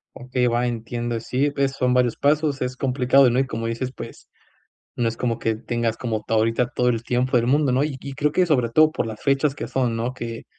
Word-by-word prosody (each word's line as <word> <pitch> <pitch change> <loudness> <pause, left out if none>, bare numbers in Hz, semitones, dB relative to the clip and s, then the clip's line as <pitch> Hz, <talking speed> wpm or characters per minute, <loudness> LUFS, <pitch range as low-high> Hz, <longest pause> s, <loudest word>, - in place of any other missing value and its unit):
Okey, 125 0 -1
va, 120 +1 +1
entiendo, 120 0 -3
sí, 130 +5 -1
pues 140 -1 0
son 125 -2 +1
varios 125 -2 +2
pasos, 145 -1 +1
es 125 0 -2
complicado, 130 0 +3
¿no? 120 - 0
Y, 135 - +2
como 115 -2 -4
dices, 120 +3 -3
pues 115 - -10 0.7
no 120 -1 0
es 115 - -4
como 115 -2 -1
que 110 -1 -1
tengas 120 0 -2
como 110 -3 -3
todo 110 - +1
ahorita 115 +2 +1
todo 125 - +2
el 115 -2 -2
tiempos 125 +1 +1
del 115 - -2
mundo, 140 +1 +2
¿no? 130 +2 +2
Y 150 -3 -3
y 140 - -7
creo 145 +2 0
que, 185 - +3
sobre 135 -9 +1
todo 155 +5 +4
por - - -2
las 110 -1 -7
fechas 140 0 +1
que - - -5
son, 125 -3 -1
¿no? 120 +2 -2
Que 115 -2 -7
125 Hz, 240 wpm, -23 LUFS, 115-135 Hz, 0.7 s, todo